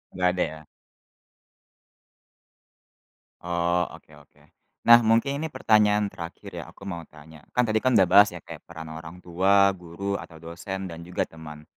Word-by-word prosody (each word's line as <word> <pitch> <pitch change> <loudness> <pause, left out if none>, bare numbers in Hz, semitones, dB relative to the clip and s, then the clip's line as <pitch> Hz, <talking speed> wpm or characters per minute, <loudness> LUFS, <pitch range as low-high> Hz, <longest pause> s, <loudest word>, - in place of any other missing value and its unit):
Nggak 90 -1 +2
ada, - - +2
ya? 80 - -10 2.8
Oh, 85 0 0
oke - - -19
oke. - - -24 0.4
Nah, 120 0 +9
mungkin 115 +5 +2
ini 160 - -2
pertanyaan 105 -6 +2
terakhir 85 0 -9
ya, - - -6
aku - - -17
mau 90 -4 -5
tanya. 80 +1 -15 0.2
Kan 125 - +4
tadi 110 -1 +1
kan 130 +1 +1
udah 95 - +5
bahas 100 +3 +7
ya, 85 - -10
kayak - - -11
peran 80 -2 -9
orang 80 +3 -10
tua, 95 +3 +3
guru, 100 +4 -4
atau 80 -2 -11
dosen, 95 +2 -6
dan 85 0 -9
juga 90 - -1
teman. 75 -2 -11
90 Hz, 160 wpm, -25 LUFS, 85-105 Hz, 2.8 s, Nah